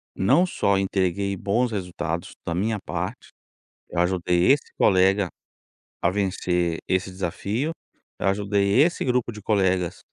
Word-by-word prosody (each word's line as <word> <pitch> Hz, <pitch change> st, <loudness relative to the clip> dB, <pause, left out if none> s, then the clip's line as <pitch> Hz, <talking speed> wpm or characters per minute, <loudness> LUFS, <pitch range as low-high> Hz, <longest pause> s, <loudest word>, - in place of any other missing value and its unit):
não 135 Hz, -, +4 dB
só 100 Hz, -, +1 dB
entreguei 95 Hz, 0 st, 0 dB
bons 115 Hz, +6 st, 0 dB
resultados 85 Hz, -4 st, -4 dB
da 85 Hz, -, -2 dB
minha 105 Hz, +5 st, 0 dB
parte, 90 Hz, +7 st, -4 dB, 0.6 s
eu 85 Hz, -, -3 dB
ajudei 90 Hz, +2 st, +2 dB
esse 145 Hz, -, -3 dB
colega 95 Hz, +1 st, +4 dB, 0.7 s
a 85 Hz, -, +3 dB
vencer 90 Hz, -3 st, 0 dB
esse 95 Hz, 0 st, 0 dB
desafio. 100 Hz, -, -2 dB, 0.5 s
Eu -, -, 0 dB
ajudei 100 Hz, +3 st, +2 dB
esse 170 Hz, +3 st, +2 dB
grupo 125 Hz, -2 st, 0 dB
de 105 Hz, -, -10 dB
colegas 95 Hz, -4 st, +1 dB
95 Hz, 130 wpm, -24 LUFS, 90-105 Hz, 0.7 s, não